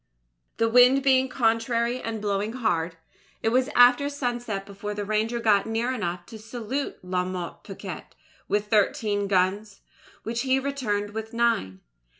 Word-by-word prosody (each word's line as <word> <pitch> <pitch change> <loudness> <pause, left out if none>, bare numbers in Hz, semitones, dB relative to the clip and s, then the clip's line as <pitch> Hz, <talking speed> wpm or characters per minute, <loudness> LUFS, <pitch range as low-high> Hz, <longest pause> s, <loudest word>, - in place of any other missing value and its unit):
"The 225 - +2
wind 250 +3 +6
being 265 -1 +4
contrary 235 0 +1
and 225 -1 -4
blowing 205 +2 -1
hard, 175 -9 -1 0.5
it 225 - +3
was 255 +3 +2
after 245 +3 +6
sunset 240 -7 -3
before 205 +1 -6
the 205 0 -3
Ranger 215 +3 0
got 210 -3 +3
near 230 +3 -1
enough 175 -6 -3
to 220 - -11
salute 240 +5 -4
La 180 0 -1
Motte 180 -2 -6
Picquet - - -8 0.4
with 205 0 0
thirteen 210 -1 +1
guns, 195 +2 0 0.4
which 230 +1 -2
he 260 0 +2
returned 245 -7 -2
with 220 +1 -6
nine. 230 - 0
225 Hz, 150 wpm, -26 LUFS, 205-245 Hz, 0.5 s, wind